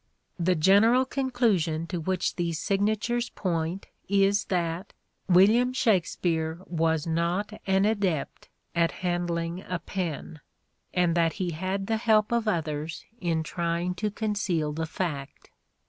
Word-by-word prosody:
The 180 Hz, +1 st, +2 dB
general 205 Hz, +10 st, +5 dB
conclusion 225 Hz, -, 0 dB
to 175 Hz, 0 st, -4 dB
which 185 Hz, +2 st, -1 dB
these 170 Hz, -2 st, -1 dB
signatures 215 Hz, +6 st, 0 dB
point 170 Hz, 0 st, -2 dB, 0.2 s
is 200 Hz, 0 st, +3 dB
that 175 Hz, +1 st, -2 dB, 0.4 s
William 215 Hz, +8 st, +5 dB
Shakspere 170 Hz, -8 st, +1 dB
was 160 Hz, -2 st, 0 dB
not 170 Hz, +6 st, -1 dB
an 195 Hz, +1 st, +3 dB
adept 200 Hz, -9 st, -1 dB, 0.2 s
at 170 Hz, -1 st, +2 dB
handling 175 Hz, 0 st, -1 dB
a 180 Hz, -, -3 dB
pen, 165 Hz, -3 st, -5 dB, 0.5 s
and 175 Hz, -2 st, +2 dB
that 165 Hz, -1 st, +2 dB
he 185 Hz, -4 st, -2 dB
had 190 Hz, +4 st, -2 dB
the 225 Hz, +2 st, 0 dB
help 220 Hz, -1 st, +3 dB
of 235 Hz, -2 st, +1 dB
others 155 Hz, -4 st, -2 dB
in 165 Hz, -4 st, 0 dB
trying 170 Hz, +2 st, -1 dB
to 210 Hz, +4 st, -2 dB
conceal 200 Hz, -8 st, -1 dB
the 160 Hz, +1 st, -3 dB
fact. 150 Hz, -5 st, -5 dB
180 Hz, 130 wpm, -27 LUFS, 165-205 Hz, 0.5 s, general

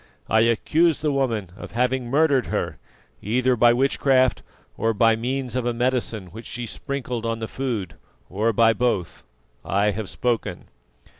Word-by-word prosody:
I 110 Hz, -, +3 dB
accuse 150 Hz, +9 st, +3 dB
the 150 Hz, 0 st, -1 dB
woman 115 Hz, -9 st, -1 dB
of -, -, -10 dB
having 125 Hz, +1 st, 0 dB
murdered 140 Hz, 0 st, +2 dB
her, -, -, -3 dB, 0.4 s
either 125 Hz, +4 st, +1 dB
by 120 Hz, 0 st, +5 dB
witchcraft 130 Hz, +1 st, +2 dB, 0.3 s
or 115 Hz, 0 st, 0 dB
by 115 Hz, +1 st, +4 dB
means 125 Hz, +2 st, -3 dB
of 125 Hz, -1 st, -1 dB
a 120 Hz, -, -1 dB
medicine 120 Hz, -5 st, -1 dB
which 115 Hz, +3 st, -9 dB
she 120 Hz, -1 st, -5 dB
sprinkled 125 Hz, -1 st, -4 dB
on 115 Hz, 0 st, -1 dB
the 110 Hz, 0 st, -4 dB
food, 115 Hz, -11 st, -3 dB, 0.3 s
or 105 Hz, +5 st, 0 dB
by 115 Hz, +1 st, +4 dB
both. 105 Hz, -6 st, -1 dB, 0.4 s
I 100 Hz, +2 st, +1 dB
have 100 Hz, -1 st, -5 dB
spoken." 120 Hz, +2 st, -2 dB
120 Hz, 155 wpm, -23 LUFS, 110-130 Hz, 0.4 s, by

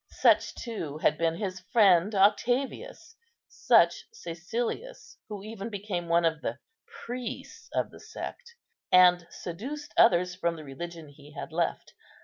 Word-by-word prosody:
Such, -, -, +3 dB
too, 170 Hz, -, -5 dB
had 155 Hz, -, +2 dB
been 165 Hz, +1 st, 0 dB
his 190 Hz, -1 st, -4 dB
friend 195 Hz, 0 st, +4 dB
Octavius; 250 Hz, -, +1 dB, 0.3 s
such -, -, +3 dB
Cæcilius, 235 Hz, -, -5 dB
who 205 Hz, -2 st, -6 dB
even 215 Hz, 0 st, -6 dB
became 195 Hz, -4 st, -4 dB
one 170 Hz, 0 st, +3 dB
of 160 Hz, -2 st, 0 dB
the -, -, -3 dB, 0.3 s
priests 245 Hz, -1 st, -7 dB
of -, -, -1 dB
the -, -, -13 dB
sect, 475 Hz, -1 st, -8 dB, 0.4 s
and 180 Hz, -1 st, +6 dB
seduced 275 Hz, -, -7 dB
others 180 Hz, +1 st, +5 dB
from 170 Hz, -2 st, -1 dB
the 155 Hz, -, -9 dB
religion 165 Hz, +3 st, -8 dB
he 145 Hz, +1 st, -16 dB
had 155 Hz, +2 st, -7 dB
left. 170 Hz, +1 st, -2 dB
185 Hz, 135 wpm, -28 LUFS, 170-225 Hz, 0.4 s, and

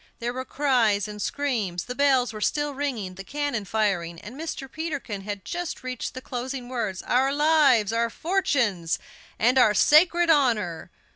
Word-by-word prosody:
There 240 Hz, +1 st, -3 dB
were 260 Hz, +1 st, -5 dB
cries 235 Hz, -8 st, +1 dB
and 210 Hz, 0 st, -7 dB
screams. 220 Hz, -13 st, -2 dB
The 250 Hz, -, -5 dB
bells 260 Hz, -3 st, +2 dB
were 215 Hz, -, -7 dB
still 295 Hz, +5 st, 0 dB
ringing, 255 Hz, -10 st, -3 dB
the 190 Hz, +1 st, -9 dB
cannon 285 Hz, -3 st, -3 dB
firing, 180 Hz, -5 st, -1 dB
and 230 Hz, +8 st, -10 dB
Mr. 305 Hz, -2 st, -5 dB
Peterkin 285 Hz, -9 st, -5 dB
had 200 Hz, -1 st, -6 dB
just 350 Hz, -4 st, -4 dB
reached 255 Hz, -1 st, -5 dB
the 255 Hz, -, -6 dB
closing 250 Hz, 0 st, -5 dB
words: 230 Hz, -7 st, -3 dB
"Our 265 Hz, +2 st, +2 dB
lives, 285 Hz, -8 st, +4 dB
our 230 Hz, 0 st, +1 dB
fortunes, 235 Hz, -, 0 dB, 0.4 s
and 250 Hz, +4 st, +3 dB
our 215 Hz, -4 st, +5 dB
sacred 340 Hz, -, +5 dB
honor." 215 Hz, -, +1 dB
250 Hz, 160 wpm, -25 LUFS, 210-285 Hz, 0.4 s, our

